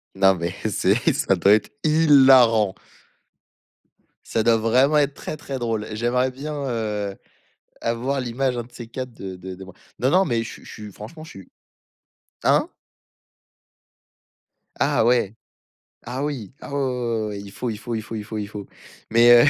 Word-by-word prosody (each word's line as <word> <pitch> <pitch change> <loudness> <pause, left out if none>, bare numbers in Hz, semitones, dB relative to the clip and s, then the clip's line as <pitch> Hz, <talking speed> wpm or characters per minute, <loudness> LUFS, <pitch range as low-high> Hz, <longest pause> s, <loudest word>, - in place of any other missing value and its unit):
Non 95 0 +5
mais 85 0 -3
c'est - - +2
ça - - +2
doit 100 - +5
être 110 - +2
hilarant. 130 -9 +6 1.5
Ça 110 - 0
doit 115 0 +4
vraiment 130 +7 +3
être 145 -1 +2
très, 155 - -6
très 135 -2 -6
drôle. 115 -3 -2
J'aimerais 125 +3 +1
bien, 145 +4 -6 0.2
heu, 105 -4 -2 0.7
avoir 125 +4 -1
l'image 125 +1 -1
un 120 - -2
de 120 - -20
ces 120 -2 -9
quatre 130 +1 -6
de 95 -4 -7
de 95 +1 -8
de 95 +1 -10
moi. 95 -1 -13 0.2
Non, 130 - +2
non, 185 +5 +4
mais 120 -9 0
je 110 - -6
suis - - -12
je - - -11
suis 105 -1 -9
franchement 115 - -10
je 160 - -12
suis 95 -2 -13 0.9
hein? - - +3 2.1
Ah - - +3
ouais, 120 -4 +2 0.7
ah 130 +4 -3
oui, 135 -9 -4
ah - - -9
ouais, - - 0
ouais, 130 - 0
ouais, 120 -2 -2
ouais, - - -2
ouais, 100 -1 -5
il 100 0 -10
faut, 120 +4 -3
il 105 - -5
faut, 120 +2 -5
il 110 - -2
faut, 115 - -8
il 105 - -5
faut, 110 +1 -5
il 105 - -3
faut. 105 -1 -8 0.4
Mais, 120 +1 +7
heu, - - +6
115 Hz, 185 wpm, -23 LUFS, 105-130 Hz, 2.1 s, Mais